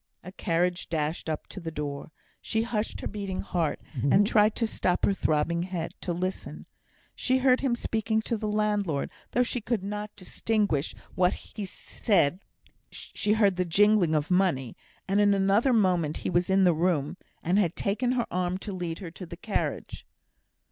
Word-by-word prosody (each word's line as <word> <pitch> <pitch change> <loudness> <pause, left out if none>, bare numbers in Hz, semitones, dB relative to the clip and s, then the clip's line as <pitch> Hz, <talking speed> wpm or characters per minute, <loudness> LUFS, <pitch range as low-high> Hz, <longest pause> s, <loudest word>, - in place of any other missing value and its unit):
A 180 - -8
carriage 180 -1 -1
dashed 160 0 -2
up 155 - -3
to - - -9
the 165 -3 -5
door. 145 -1 -5 0.3
She 220 0 0
hushed 230 -2 -2
her - - -3
beating 200 -2 -4
heart, 170 -6 -1 0.3
and 200 +8 +5
tried 210 0 +4
to 230 - +1
stop 180 -4 0
her 200 - +3
throbbing 170 -2 +1
head 175 -2 -3
to 180 - -2
listen. 185 +2 -4 0.5
She 260 0 +1
heard 255 -1 +4
him 265 -3 +1
speaking 220 -1 -1
to 230 - -1
the 215 -1 -3
landlord, 210 -8 0 0.2
though 250 - +4
she 245 0 -2
could 215 -3 -1
not 210 +1 -4
distinguish 200 -5 -1 0.2
what 180 0 +2
he 210 - -7
said; 185 -3 +1 1.0
heard 200 -4 +3
the 180 - +2
jingling 185 -1 +4
of 150 +3 0
money, 175 -10 +1 0.3
and, 200 +2 +3
in 205 -1 +5
another 200 +6 +3
moment, 180 -9 +2
he - - 0
was 175 +1 +1
in 190 0 +4
the 180 -2 +5
room, 160 -3 0 0.3
and 180 +5 +2
had 175 -5 +1
taken 240 +5 0
her 240 -2 0
arm 180 0 0
to 200 +1 -6
lead 175 -3 -3
her 180 -5 -7
to 180 +2 -8
the 170 0 -8
carriage. 205 +3 -3
190 Hz, 175 wpm, -28 LUFS, 170-210 Hz, 1.0 s, and